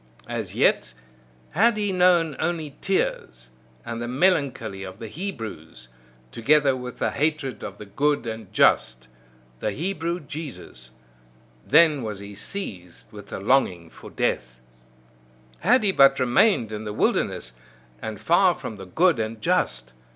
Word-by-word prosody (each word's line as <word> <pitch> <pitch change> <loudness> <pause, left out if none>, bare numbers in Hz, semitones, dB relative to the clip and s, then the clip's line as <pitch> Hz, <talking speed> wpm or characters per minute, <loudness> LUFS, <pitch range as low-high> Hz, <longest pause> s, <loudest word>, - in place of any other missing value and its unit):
As - - -4
yet - - +2 0.6
had 215 +7 +3
he 205 -2 0
known 175 -4 +3
only 160 -3 -2
tears, 60 - -2 0.4
and 115 0 -5
the 120 - -3
melancholy 140 - 0
of 95 0 -8
the 115 0 -7
Hebrews, 110 - -7 0.4
together 140 +3 +3
with 125 -1 -7
the - - 0
hatred 150 -4 -1
of 100 - -7
the 105 - -9
good 140 +8 0
and 110 -3 -6
just 65 0 +2 0.5
the 105 - -1
Hebrew 170 - -2
Jesus: 140 - -8 0.8
then 155 -4 +5
was 110 -3 -4
he 100 +1 -9
seized 100 - -7
with 105 -2 -11
the - - -6
longing 95 -7 +1
for - - -12
death. 60 -1 -2 1.0
Had 230 +7 +3
he 200 - +3
but 135 -5 +5
remained 125 - +3
in 105 0 -5
the 105 -1 -5
wilderness, 65 - 0 0.5
and 110 -2 -5
far 175 +1 +4
from 110 - -7
the 95 -1 -10
good 170 - +3
and 110 0 -3
just! 60 - -1
125 Hz, 145 wpm, -24 LUFS, 100-165 Hz, 1.0 s, then